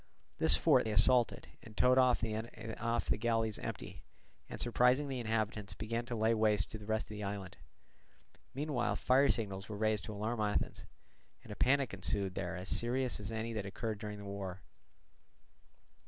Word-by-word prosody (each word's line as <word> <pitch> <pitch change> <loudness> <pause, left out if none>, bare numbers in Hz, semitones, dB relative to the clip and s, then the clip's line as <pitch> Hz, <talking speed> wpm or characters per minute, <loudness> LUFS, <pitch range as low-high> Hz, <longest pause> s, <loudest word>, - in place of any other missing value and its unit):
This - - +4
fort - - +4
they 110 - -1
assaulted, 120 +3 +3
and 110 -2 -14
towed 130 +1 +5
off 130 -1 +4
the 115 +1 -2
galleys 115 -1 +1
empty, - - -6 0.5
and - - -6
surprising 125 +4 +3
the 135 -2 -3
inhabitants 110 -3 -2
began 115 +2 -3
to 120 - -3
lay 110 +1 +3
waste 105 -3 +2
the 110 -1 -7
rest 110 +1 -1
of - - -23
the 105 -1 -6
island. 100 -2 -5 1.0
Meanwhile 140 -4 0
fire 135 +2 +4
signals 100 -3 -1
were 105 - -5
raised 110 -1 +1
to 110 - -6
alarm 110 +3 -2
Athens, 105 -1 -1 0.6
and - - -11
a - - -5
panic 135 +2 +2
ensued 95 0 -1
there 90 0 -3
as 90 +1 -6
serious 125 +3 0
as 105 +1 -5
any 115 +1 -3
that 105 -3 -3
occurred 105 +1 -4
during 105 -1 -5
the 100 - -9
war. 95 -2 -6
110 Hz, 170 wpm, -34 LUFS, 105-120 Hz, 1.0 s, towed